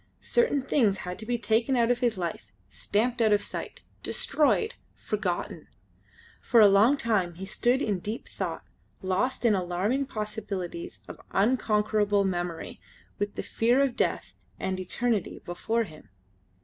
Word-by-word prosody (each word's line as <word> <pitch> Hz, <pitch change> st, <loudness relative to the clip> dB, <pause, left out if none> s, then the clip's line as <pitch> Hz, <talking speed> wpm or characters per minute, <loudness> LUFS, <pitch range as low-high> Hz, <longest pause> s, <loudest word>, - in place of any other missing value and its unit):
Certain 470 Hz, -, +2 dB
things 230 Hz, -8 st, +2 dB
had 180 Hz, 0 st, -5 dB
to 220 Hz, -, -8 dB
be 240 Hz, 0 st, +1 dB
taken 230 Hz, +3 st, +1 dB
out 235 Hz, -1 st, +3 dB
of 245 Hz, -, +1 dB
his 240 Hz, -4 st, +1 dB
life, 170 Hz, -3 st, -4 dB, 0.2 s
stamped 235 Hz, +3 st, 0 dB
out 220 Hz, -1 st, +4 dB
of 205 Hz, -, +5 dB
sight, -, -, -7 dB, 0.2 s
destroyed, 445 Hz, -1 st, +1 dB, 0.2 s
forgotten. 200 Hz, -5 st, -3 dB, 0.7 s
For 235 Hz, -, +4 dB
a 210 Hz, -, +9 dB
long 210 Hz, +8 st, +5 dB
time 200 Hz, -9 st, 0 dB
he 190 Hz, +3 st, -6 dB
stood 245 Hz, +7 st, +1 dB
in 205 Hz, -4 st, 0 dB
deep 215 Hz, +6 st, -5 dB
thought, -, -, -4 dB, 0.4 s
lost 195 Hz, +8 st, 0 dB
in 225 Hz, -, +5 dB
the 195 Hz, -, +2 dB
alarming 195 Hz, +10 st, -1 dB
possibilities 215 Hz, -, -5 dB
of -, -, -10 dB
unconquerable 210 Hz, -2 st, +2 dB
memory, 175 Hz, -3 st, -3 dB, 0.4 s
with 205 Hz, 0 st, -2 dB
the -, -, -4 dB
fear 240 Hz, +3 st, +2 dB
of 270 Hz, -3 st, 0 dB
death -, -, -1 dB, 0.3 s
and 190 Hz, 0 st, -2 dB
eternity 215 Hz, +2 st, -1 dB
before 225 Hz, +6 st, -1 dB
him. 155 Hz, -7 st, -13 dB
215 Hz, 150 wpm, -28 LUFS, 190-245 Hz, 0.7 s, a